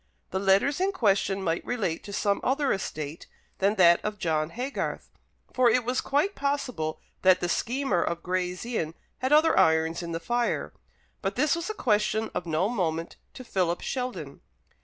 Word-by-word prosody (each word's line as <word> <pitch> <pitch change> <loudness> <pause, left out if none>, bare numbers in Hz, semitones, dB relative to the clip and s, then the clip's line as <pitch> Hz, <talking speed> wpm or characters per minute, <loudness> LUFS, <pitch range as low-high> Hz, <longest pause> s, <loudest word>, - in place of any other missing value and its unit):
The 190 - -1
letters 200 - +3
in 390 +1 +1
question 200 - +1
might 165 -1 -1
relate 195 -9 -2
to 205 - -7
some 200 0 +1
other 275 +2 +2
estate 155 -5 -5 0.3
than 200 +2 +2
that 175 -3 +5
of 210 0 -3
John 155 -3 0
Haygarth, 250 +9 -4 0.4
for 255 -1 +4
it 235 +1 +2
was 250 +2 0
quite 295 +9 +1
possible 255 - -2 0.2
that 185 -1 +5
the 175 - -1
schemer 240 0 0
of 170 0 -2
Gray's 180 +1 -2
Inn 170 -10 -2 0.2
had 260 +2 -1
other 310 +2 +5
irons 160 +1 +3
in 170 -1 -5
the 165 - -2
fire. 240 +7 -1 0.5
But 195 +1 -2
this 290 +4 +2
was 335 +3 -4
a 435 - -3
question 215 -1 +1
of 175 - -3
no 165 +4 +1
moment 170 -7 -2 0.2
to 255 - -8
Philip 180 -7 -1
Sheldon. 255 -1 -4
200 Hz, 175 wpm, -27 LUFS, 170-255 Hz, 0.5 s, that